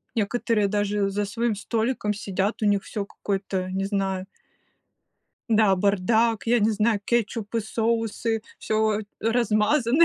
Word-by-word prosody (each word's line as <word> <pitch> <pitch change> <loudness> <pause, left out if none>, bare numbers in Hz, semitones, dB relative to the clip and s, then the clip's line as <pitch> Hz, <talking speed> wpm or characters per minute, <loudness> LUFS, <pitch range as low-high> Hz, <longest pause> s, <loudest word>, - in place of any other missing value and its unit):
некоторые 220 -1 +1
даже 205 0 0
за 205 +1 -1
своим 230 +2 -1
столиком 220 0 -1
сидят, 200 0 -2
у 215 - +1
них 200 -1 +2
все 205 -2 -4
какой-то, 195 -2 -3
не 190 +1 -2
знаю. 195 -2 -1 1.3
Да, 215 -3 +5
бардак, 210 +4 +2
я 235 +1 +3
не 210 +2 +3
знаю, 215 0 +1
кетчупы, 230 -1 -1
соусы, 225 0 -1 0.2
всё 215 -1 +1 0.2
размазано, 235 +5 +3
210 Hz, 125 wpm, -25 LUFS, 200-230 Hz, 1.3 s, Да